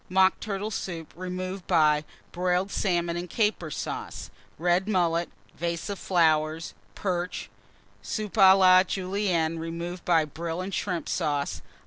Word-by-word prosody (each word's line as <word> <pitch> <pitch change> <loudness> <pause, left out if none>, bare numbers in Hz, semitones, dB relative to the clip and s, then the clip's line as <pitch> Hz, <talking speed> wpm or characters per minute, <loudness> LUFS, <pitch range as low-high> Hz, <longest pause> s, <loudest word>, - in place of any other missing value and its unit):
_ - - -34
Mock 190 +1 +4
Turtle 210 0 -3
Soup, 170 -6 -5
removed 185 +1 -5
by 155 -3 +4 0.3
Broiled 180 +2 0
Salmon 175 -3 0
and 175 +1 -4
Caper 210 -7 0
Sauce. - - -5 0.3
Red 175 +4 +2
Mullet. 175 -4 +1 0.3
Vase 170 +4 -3
of 200 - -5
Perch. - - -11 0.9
Flowers. 180 -2 -3 0.5
Soup 215 -2 -4
à 190 -2 +7
la 185 -1 +7
Julienne, 185 -4 -1
removed 170 +2 -5
by 165 -3 +3
Brill 165 +3 -5
and 190 +2 -4
Shrimp 180 -5 -2
Sauce. 145 -2 -1
180 Hz, 135 wpm, -27 LUFS, 170-190 Hz, 0.9 s, à